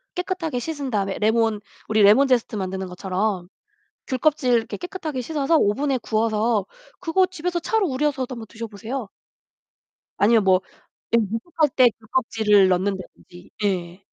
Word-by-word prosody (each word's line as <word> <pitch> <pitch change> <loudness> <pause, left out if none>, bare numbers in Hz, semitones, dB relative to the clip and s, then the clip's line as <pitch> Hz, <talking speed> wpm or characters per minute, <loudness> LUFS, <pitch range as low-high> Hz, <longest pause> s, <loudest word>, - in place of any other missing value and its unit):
깨끗하게 360 -7 -2
씻은 285 0 -4
다음에 200 -3 -1
레몬 220 -1 +2 0.3
우리 215 0 +2
레몬제스트 240 +2 +4
만드는 190 0 -3
것처럼 185 0 -2 0.6
귤껍질 270 -1 +1
이렇게 230 +1 0
깨끗하게 340 -7 -5
씻어서 295 +3 0
오븐에 265 +6 +1
구워서 220 -2 0 0.3
그거 370 +2 +2
집에서 360 -1 -3
차로 425 +3 +1
우려서도 265 -2 -1
한번 225 -2 -8
드셔 230 +1 -7
보세요. 225 +3 -6 1.1
아니면 220 +1 +4
뭐 185 -1 +4 0.5
예 235 - +5
목욕할 230 - 0
때 255 -2 +7
귤껍질을 220 -3 +2
넣는다든지. 185 -1 -3
예. 180 -3 -1
230 Hz, 340 characters per minute, -23 LUFS, 205-285 Hz, 1.1 s, 때